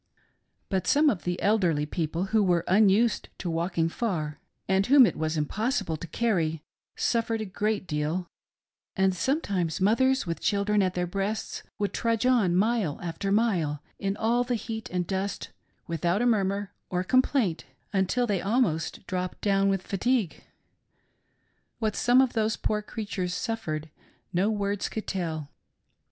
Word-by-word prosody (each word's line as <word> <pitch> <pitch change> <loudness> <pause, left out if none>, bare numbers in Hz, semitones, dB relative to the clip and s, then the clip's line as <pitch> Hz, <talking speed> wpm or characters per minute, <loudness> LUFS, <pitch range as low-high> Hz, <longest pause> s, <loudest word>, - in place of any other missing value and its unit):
But 190 -2 -1
some 295 0 +5
of 190 - -5
the 175 0 -1
elderly 180 -8 +2
peo 160 +1 -2
ple 165 +4 -2
who 220 - +5
were 175 -3 +2
unused 210 +4 +3
to 175 - -3
walking 165 0 0
far, 165 -6 -2 0.3
and 190 0 +3
whom 270 0 +8
it - - 0
was 160 0 -1
impos 215 - 0
sible 165 -4 -3
to 170 - -7
carry, 165 -6 0 0.3
suffered 230 -1 0
a 215 - -3
great 205 +1 -1
deal; 155 +3 -2 0.7
and 190 -1 +2
sometimes 185 - -1
mothers 260 +7 +3
with 170 -1 -3
children 205 0 +1
at 185 -1 0
their 180 0 0
breasts 195 +4 -3 0.2
would 205 -1 -1
trudge 230 0 0
on 225 -9 +3
mile 205 -5 +1
after 175 +4 -3
mile 180 -10 +1 0.2
in 195 +1 -2
all 235 +2 +2
the 245 0 -1
heat 220 -1 -5
and 180 -1 -1
dust 195 +2 -3 0.3
without 170 +6 0
a - - +2
murmur 200 -3 +1 0.2
or 180 0 -1
complaint 255 - +2 0.3
until 195 +6 +1
they 200 -5 0
almost 195 -7 0
dropped 185 -1 -3
down 195 -1 +2
with 195 -1 0
fatigue. 220 -1 0 1.3
What 215 -3 -1
some 245 +2 +5
of 260 -2 +1
those 220 -1 0
poor 210 0 -1
creatures 200 -4 -4
suffered, 180 -10 -3 0.5
no 185 +4 +2
words 205 -2 -1
could 220 - -5
tell. 160 -6 -3
195 Hz, 155 wpm, -27 LUFS, 175-225 Hz, 1.3 s, whom